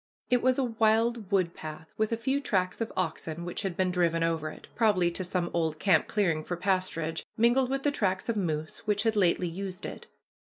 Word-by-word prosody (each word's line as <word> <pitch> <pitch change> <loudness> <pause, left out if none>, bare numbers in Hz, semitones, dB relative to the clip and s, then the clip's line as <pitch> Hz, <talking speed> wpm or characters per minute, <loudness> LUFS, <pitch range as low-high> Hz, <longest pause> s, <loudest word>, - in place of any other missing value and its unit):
It 245 -1 +4
was 255 0 +3
a 270 - +2
wild 225 -2 +1
wood 185 -4 +2
path, 155 0 -9
with 220 0 0
a 230 - +1
few 265 +5 0
tracks 185 -5 0
of 230 - -2
oxen 165 -1 -2
which 175 - -3
had 190 -3 -3
been 185 -1 +2
driven 170 -2 +2
over 165 -2 0
it, - - -12
probably 200 -7 +3
to 185 - -4
some 180 -1 -1
old 160 -2 0
camp 165 -1 +3
clearing 170 -7 +1
for 175 - -4
pasturage, 175 -4 -1 0.2
mingled 240 +3 +4
with 270 0 -1
the 290 - +2
tracks 190 -7 0
of 230 - 0
moose 160 -6 -2
which 210 0 +2
had 225 -1 +2
lately 180 -2 +3
used 185 +2 -5
it. - - -7
185 Hz, 215 wpm, -29 LUFS, 170-225 Hz, 0.2 s, It